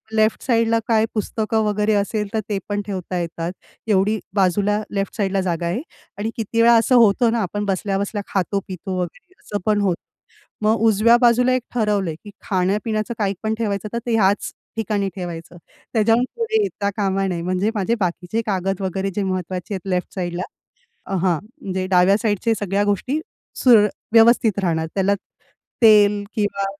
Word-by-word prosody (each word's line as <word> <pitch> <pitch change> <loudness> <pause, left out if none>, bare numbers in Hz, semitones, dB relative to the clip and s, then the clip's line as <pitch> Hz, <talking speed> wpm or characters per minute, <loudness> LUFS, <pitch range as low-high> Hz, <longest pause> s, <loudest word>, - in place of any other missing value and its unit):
Left 215 0 +2
साइडला 230 -2 +2
काय 220 -1 +3
पुस्तकं 220 0 -1
वगैरे 210 +1 +1
असेल 210 +1 -1
तर 220 - +1
ते 205 - 0
पण 205 0 -1
ठेवता 185 -2 -4
येतात. 170 0 -3 0.4
एवढी 210 +1 +2 0.2
बाजूला 200 +2 +2
लेफ्ट 195 -1 -2
साइडला 195 -2 0
जागा 175 -2 -2
आहे 180 +9 -1 0.4
आणि 210 +2 -2
किती 230 +1 0
वेळा 235 +1 +6
असं 240 +3 +3
होतं 230 0 +5
ना 235 - 0
आपण 205 +2 -3
बसल्या-बसल्या 200 +1 -1
खातो 195 +1 -1
पितो 185 0 -5
वगैरे 180 - -6
असं 205 -1 -5
पण 210 -1 +2
होतं. 185 -4 0 0.6
मग 220 +1 +3
उजव्या 225 +2 +5
बाजूला 245 +1 +4
एक 255 - +1
ठरवलं 210 -6 +1
आहे 155 - -4
की 205 - -10
खाण्यापिण्याचं 210 +4 -1
काही 200 -2 0
पण 220 0 0
ठेवायचं 210 -2 -2
तर 235 - -1
ते 235 -2 +1
ह्याच 205 -1 +2 0.2
ठिकाणी 205 -3 -1
ठेवायचं. 175 -2 -7 0.4
त्याच्याहून 225 +2 +3
पुढे 445 -2 +1
येता 205 - -2
कामा 195 -1 0
नये. 175 -3 -2
म्हणजे 185 +5 0
माझे 215 +3 +1
बाकीचे 180 +4 -1
कागद 195 -1 -1
वगैरे 190 +1 -2
जे 205 - 0
महत्वाचे 185 +1 -3
आहेत 190 0 -5
लेफ्ट 180 -1 -2
साइडला 175 -1 -3 0.6
अ, - - -5
हां 175 -3 +1 0.2
म्हणजे 185 -1 -3
डाव्या 185 +1 +4
साइडच्या 220 0 +1
सगळ्या 200 0 0
गोष्टी 230 +9 0 0.4
सुरळ 225 -5 +7 0.3
व्यवस्थित 225 -3 +5
राहणार. 160 -2 0
त्याला 195 +1 +2 0.7
तेल 210 -2 +6
किंवा 205 -2 -1
205 Hz, 170 wpm, -21 LUFS, 190-220 Hz, 0.7 s, सुरळ